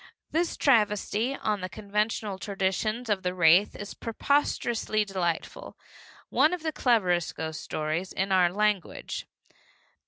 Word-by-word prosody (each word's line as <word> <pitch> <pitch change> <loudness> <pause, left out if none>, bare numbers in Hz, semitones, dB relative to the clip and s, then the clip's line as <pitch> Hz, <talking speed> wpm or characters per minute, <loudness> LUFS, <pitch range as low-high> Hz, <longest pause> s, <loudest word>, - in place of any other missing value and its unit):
This 335 +2 0
travesty 225 0 +2
on 210 -6 -2
the 185 - -4
conventional 210 0 -2
traditions 205 +4 -1
of 205 -3 0
the 180 0 -2
wraith 175 +3 +5
is 205 - -7
preposterously 230 -3 0
delightful, 180 -4 -3 0.5
one 315 +4 +3
of 345 - -12
the 315 - 0
cleverest 190 - +1
ghost 160 -1 -5
stories 155 +4 -3
in 195 +1 -2
our 180 -2 +4
language. 210 -1 -1
205 Hz, 125 wpm, -27 LUFS, 185-225 Hz, 0.5 s, wraith